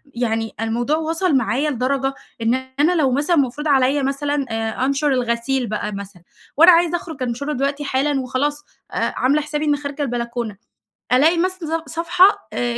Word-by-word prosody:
يعني 225 Hz, -2 st, -1 dB
الموضوع 240 Hz, +7 st, 0 dB
وصل 325 Hz, +1 st, 0 dB
معايا 265 Hz, +4 st, +1 dB
لدرجة، 270 Hz, +1 st, -1 dB, 0.3 s
إن 225 Hz, +1 st, +2 dB, 0.3 s
أنا 325 Hz, +5 st, +3 dB
لو 280 Hz, -6 st, +2 dB
مثلًا 290 Hz, +6 st, +1 dB
مفروض 285 Hz, +1 st, 0 dB
عليَّ 275 Hz, 0 st, +3 dB
مثلًا 280 Hz, +1 st, -1 dB
آآ، 225 Hz, +2 st, -2 dB
أنشر 275 Hz, +2 st, 0 dB
الغسيل 245 Hz, +1 st, 0 dB
بقى 210 Hz, 0 st, -3 dB
مثلًا، 200 Hz, -3 st, -8 dB, 0.3 s
وأنا 335 Hz, +4 st, +9 dB
عايزة 345 Hz, 0 st, +3 dB
أخرج 320 Hz, -6 st, -7 dB
أنشرُه 255 Hz, +5 st, -3 dB
دلوقتي 280 Hz, +2 st, -1 dB
حالًا 275 Hz, 0 st, 0 dB
وخلاص 290 Hz, +4 st, -2 dB, 0.3 s
آآ، -, -, -1 dB
عاملة 285 Hz, +4 st, +2 dB
حسابي 300 Hz, 0 st, -3 dB
إني 295 Hz, -1 st, +2 dB
خارجة 285 Hz, 0 st, -6 dB
البلكونة، 235 Hz, -4 st, -3 dB, 0.6 s
ألاقي 315 Hz, +7 st, +4 dB
مثلًا 335 Hz, -3 st, -1 dB
ص 320 Hz, -, -9 dB
صفحة 355 Hz, +4 st, +3 dB
آآ، 240 Hz, -1 st, -1 dB
275 Hz, 165 wpm, -20 LUFS, 245-300 Hz, 0.6 s, وأنا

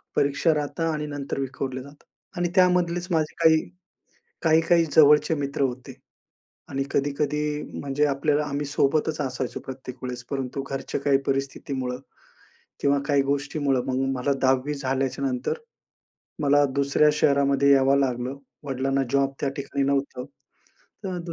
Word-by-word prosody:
परीक्षा 145 Hz, +3 st, +2 dB
राहतात 155 Hz, +2 st, -2 dB
आणि 150 Hz, -1 st, -3 dB
नंतर 140 Hz, -1 st, -4 dB
विखुरले 130 Hz, -1 st, -4 dB
जातं. 140 Hz, +2 st, -15 dB, 0.3 s
आणि 175 Hz, 0 st, 0 dB
त्यामधलेच 180 Hz, -1 st, +3 dB
माझे 155 Hz, -2 st, +1 dB
काही, 160 Hz, -1 st, +6 dB, 0.8 s
काही-काही 165 Hz, +1 st, +4 dB
जवळचे 150 Hz, +1 st, +6 dB
मित्र 140 Hz, -1 st, -3 dB
होते 130 Hz, -1 st, -3 dB, 0.8 s
आणि 135 Hz, 0 st, -1 dB
कधी-कधी 150 Hz, +1 st, -1 dB, 0.2 s
म्हणजे 145 Hz, +1 st, 0 dB
आपल्याला 145 Hz, +1 st, +1 dB
आम्ही 145 Hz, 0 st, -3 dB
सोबतच 150 Hz, +2 st, +1 dB
असायचो 130 Hz, -2 st, -3 dB
प्रत्येक 130 Hz, -1 st, -8 dB
वेळेस, 125 Hz, -1 st, -5 dB
परंतु 135 Hz, 0 st, -3 dB
घरच्या 135 Hz, 0 st, -3 dB
काही 140 Hz, -1 st, +3 dB
परिस्थितीमुळं 135 Hz, -2 st, -2 dB, 0.8 s
किंवा 140 Hz, 0 st, +3 dB
काही 140 Hz, -2 st, +3 dB
गोष्टीमुळं 140 Hz, -1 st, 0 dB
मग 130 Hz, -, -1 dB, 0.2 s
मला 130 Hz, +3 st, 0 dB
10वी 130 Hz, +2 st, +2 dB
झाल्याच्यानंतर 135 Hz, -, -2 dB, 0.8 s
मला 145 Hz, 0 st, +4 dB
दुसऱ्या 140 Hz, +2 st, +3 dB
शहरामध्ये 140 Hz, -1 st, +3 dB
यावं 135 Hz, 0 st, +4 dB
लागलं, 130 Hz, 0 st, -1 dB, 0.3 s
वडिलांना 135 Hz, 0 st, 0 dB
जॉब 140 Hz, 0 st, +2 dB
त्या 140 Hz, -, 0 dB
ठिकाणी 140 Hz, 0 st, -2 dB
नव्हतं. 140 Hz, -2 st, -1 dB, 0.8 s
तर 185 Hz, -2 st, -3 dB
140 Hz, 125 wpm, -25 LUFS, 135-150 Hz, 0.8 s, काही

